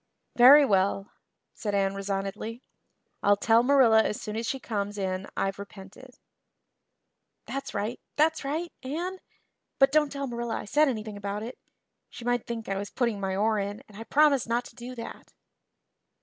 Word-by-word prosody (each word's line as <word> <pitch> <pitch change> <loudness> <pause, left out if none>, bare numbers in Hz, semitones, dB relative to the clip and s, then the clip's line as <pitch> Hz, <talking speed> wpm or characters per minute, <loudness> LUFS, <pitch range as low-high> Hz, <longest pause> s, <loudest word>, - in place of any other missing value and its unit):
"Very 275 +4 +9
well," 195 -2 +1 0.4
said 205 -3 -3
Anne 195 -1 +1
resignedly. 195 +4 -4 0.6
"I'll 205 0 +4
tell 225 +3 +4
Marilla 245 -4 +5
as 210 - -2
soon 210 - -6
as 225 +1 -3
she 270 - -2
comes 205 -3 -3
in 190 -1 -2
I've 195 0 -1
repented." 200 +5 -12 1.3
"That's 275 +1 -5
right 215 +4 -2 0.2
that's 315 +1 +2
right, 315 +5 -3
Anne. 345 +8 -4 0.6
But 270 0 +5
don't 300 -1 +3
tell 280 -1 -3
Marilla 235 -2 -3
I - - -6
said 300 +8 +3
anything 215 -5 -3
about 205 +1 -4
it. 240 +3 -8 0.5
She 235 - -10
might 245 -1 0
think 230 -2 -5
I 195 - -2
was 200 - -5
putting 235 -5 -1
my 190 -1 -2
oar 215 +2 +1
in 200 +1 -4
and 210 - -17
I 220 - -7
promised 280 -4 +3
not 240 +1 0
to - - -13
do 245 +2 -8
that." 230 - -9
225 Hz, 170 wpm, -27 LUFS, 200-265 Hz, 1.3 s, Very